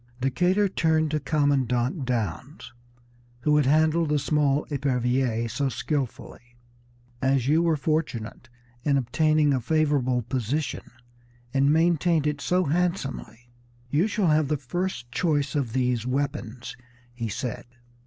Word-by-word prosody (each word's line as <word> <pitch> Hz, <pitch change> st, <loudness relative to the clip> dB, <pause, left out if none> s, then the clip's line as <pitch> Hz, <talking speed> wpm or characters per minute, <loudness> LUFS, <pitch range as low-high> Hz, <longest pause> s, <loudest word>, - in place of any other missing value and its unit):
Decatur 180 Hz, +10 st, +2 dB
turned 160 Hz, -4 st, +1 dB
to 155 Hz, -, 0 dB
Commandant 140 Hz, -2 st, 0 dB
Downes, 125 Hz, +4 st, -4 dB, 0.7 s
who 150 Hz, +3 st, +3 dB
had 145 Hz, -3 st, +2 dB
handled 155 Hz, +2 st, +3 dB
the 150 Hz, -, +2 dB
small 145 Hz, 0 st, +1 dB
Epervier 125 Hz, -4 st, 0 dB
so 135 Hz, +5 st, -1 dB
skilfully. 125 Hz, -4 st, -4 dB, 0.7 s
"As 130 Hz, -1 st, +1 dB
you 155 Hz, +3 st, +4 dB
were 165 Hz, -2 st, +2 dB
fortunate 135 Hz, -6 st, -3 dB, 0.3 s
in 140 Hz, -2 st, +2 dB
obtaining 150 Hz, +3 st, +2 dB
a 130 Hz, -, 0 dB
favorable 140 Hz, -3 st, +1 dB
position 130 Hz, +5 st, -3 dB, 0.6 s
and 140 Hz, +1 st, +3 dB
maintained 165 Hz, 0 st, +2 dB
it 150 Hz, -1 st, -1 dB
so 180 Hz, +1 st, +1 dB
handsomely, 140 Hz, -7 st, -2 dB, 0.4 s
you 160 Hz, +8 st, +2 dB
shall 205 Hz, -5 st, +1 dB
have 155 Hz, -1 st, +3 dB
the 150 Hz, +1 st, 0 dB
first 135 Hz, -2 st, -4 dB
choice 145 Hz, 0 st, 0 dB
of 140 Hz, -6 st, -1 dB
these 125 Hz, -2 st, 0 dB
weapons," 130 Hz, -2 st, -3 dB, 0.4 s
he 115 Hz, -2 st, -4 dB
said. 120 Hz, +3 st, -4 dB
140 Hz, 125 wpm, -25 LUFS, 125-155 Hz, 0.7 s, you